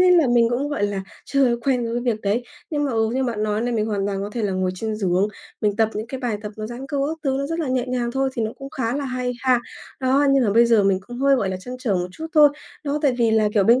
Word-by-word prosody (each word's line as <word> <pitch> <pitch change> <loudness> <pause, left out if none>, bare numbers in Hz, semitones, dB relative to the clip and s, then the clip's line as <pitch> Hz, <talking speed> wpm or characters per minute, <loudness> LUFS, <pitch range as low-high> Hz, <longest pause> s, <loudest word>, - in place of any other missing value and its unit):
nên 360 -1 +6
là 315 - +4
mình 235 -1 +4
cũng, 265 +4 -1
gọi 290 -8 -2
là, 200 -1 -3 0.2
chưa 265 -4 +2
quen 250 0 0
với 240 - -1
việc 240 -3 -1
đấy. 210 +4 0 0.3
Nhưng 295 -2 0
mà, 275 - -1
ừ, 225 -1 +1
như 265 0 +1
bạn 230 -4 -2
nói 210 0 0
này, 240 +1 -1
mình 215 -2 0
hoàn 205 -2 -1
toàn 195 -1 -2
có 205 - -4
thể 235 - -3
là 200 -2 0
ngồi 185 0 0
trên 215 +3 -3
giường, 190 -1 +1 0.3
mình 205 -1 +1
tập 220 -1 +3
những 215 +2 -3
cái 260 +2 -6
bài 240 -5 -1
tập 210 0 -6
nó 215 - -4
giãn 240 +4 -7
cơ 285 - -3
các 320 - -5
thứ 265 -1 +1
nó 280 - -1
rất 330 +3 -3
là 315 -5 -1
nhẹ 255 -1 +1
nhàng 250 -1 -1
thôi, 270 +1 +1
thì 235 - -2
nó 220 0 -2
cũng 275 -1 -8
khá 240 0 -2
là 285 - -2
hay 255 -1 -2
ha. 255 -2 +3 0.4
Đó, 265 +2 +3
nhưng 275 -2 +4
mà 210 - +2
bây 235 +2 +6
giờ 225 -3 +4
mình 195 -1 +3
cũng 240 0 -8
hơi, 275 +1 +4
gọi 200 -6 0
là, 185 - -2
trăn 250 +6 -7
trở 240 -6 0
một 180 -1 -1
chút 315 +12 -7
thôi, 300 -1 +8 0.4
đó 290 +1 0
tại 275 -4 +3
vì 230 -2 +3
là, 220 -1 +3
kiểu, 205 -3 +4
bên 235 +5 +5
240 Hz, 315 wpm, -22 LUFS, 215-265 Hz, 0.4 s, thôi